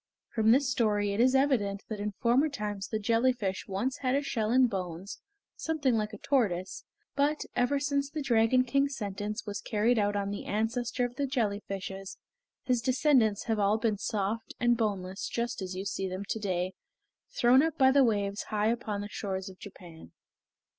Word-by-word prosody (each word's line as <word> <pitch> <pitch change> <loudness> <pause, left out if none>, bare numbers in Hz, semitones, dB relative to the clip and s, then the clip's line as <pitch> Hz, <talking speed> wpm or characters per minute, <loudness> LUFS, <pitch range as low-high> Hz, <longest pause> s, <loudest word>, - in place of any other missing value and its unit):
From 220 -1 +1
this 270 +4 +5
story 205 -4 +1
it 200 - -3
is 255 +2 +4
evident 230 -8 +1
that 215 -2 -5
in 205 0 -3
former 245 +8 +2
times 210 -7 -4
the 220 - -2
jellyfish 225 -2 0
once 230 +8 -2
had 260 -1 0
a 285 - +1
shell 230 -6 -1
and 255 +2 +5
bones 185 -2 -5 0.4
something 300 -6 0
like 215 -1 0
a 210 - -8
tortoise, 195 -9 -1 0.3
but, 290 +2 +1
ever 245 +3 +2
since 280 0 0
the 305 0 -4
Dragon 240 0 +3
King's 275 +3 +1
sentence 205 +1 -4
was 205 -2 -4
carried 220 +2 +1
out 205 0 +1
on 200 0 -1
the 205 - -5
ancestor 230 +3 -1
of 245 +1 -7
the 280 - 0
jelly 225 -7 0
fishes, 195 0 -6 0.5
his 250 -2 +1
descendants 250 -5 +3
have 225 -2 -1
all 205 +1 +3
been 220 -3 0
soft 210 +1 -2
and 240 -1 +3
boneless 195 -4 -2
just 240 -1 -3
as 185 -1 -5
you 190 +1 -4
see 195 -1 -2
them 185 +2 -4
to 220 - -1
day 185 -2 -1 0.6
thrown 245 +2 +6
up 320 0 -1
by 265 -1 +6
the 275 0 +5
waves 205 -3 0
high 215 0 +1
upon 215 -3 -3
the 205 - -5
shores 190 -2 -4
of 185 - -14
Japan. 170 - -12
220 Hz, 190 wpm, -29 LUFS, 200-255 Hz, 0.6 s, thrown